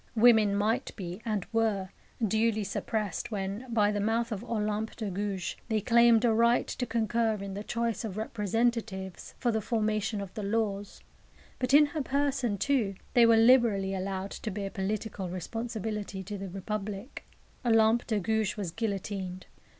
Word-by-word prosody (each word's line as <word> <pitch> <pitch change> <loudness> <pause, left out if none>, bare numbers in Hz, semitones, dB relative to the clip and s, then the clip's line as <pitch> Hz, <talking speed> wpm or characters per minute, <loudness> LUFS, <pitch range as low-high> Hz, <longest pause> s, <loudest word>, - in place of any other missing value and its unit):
Women 220 -3 +6
might 215 +3 0
be, 180 0 -6
and 210 -5 -1
were, 215 -4 +1 0.4
duly 220 +1 +1
suppressed 205 0 -2
when, 205 +4 -4
by 210 -2 +3
the 205 - -1
mouth 225 +3 0
of 210 0 -3
Olympe 215 -2 -2
de 215 -4 -4
Gouges, 195 -1 -3
they 220 -1 +2
claimed 235 +1 +5
a 230 - +4
"right 235 +2 +4
to 245 - -4
concur 225 0 +1
in 200 -1 -6
the 205 +2 -5
choice 235 0 -2
of 210 -3 -5
representatives 215 -3 -2
for 240 - +1
the 220 -1 0
formation 215 -1 0
of 195 -2 -6
the 215 - -5
laws"; 205 -1 -2 0.6
but 255 0 0
in 295 +2 +8
her 295 +1 -3
person, 270 -5 0
too, 220 -3 +1 0.2
they 235 -1 +6
were 230 -1 +6
liberally 225 -5 +5
allowed 190 0 -3
to 220 - -5
bear 195 -1 -4
political 200 -1 -3
responsibility 210 +1 -4
to 205 +2 -6
the 195 -1 -5
Republic. 200 +4 -5 0.4
Olympe 225 0 +4
de 215 -3 +1
Gouges 220 +2 0
was 195 -5 -3
guillotined. 195 -3 -3
215 Hz, 160 wpm, -29 LUFS, 195-230 Hz, 0.6 s, in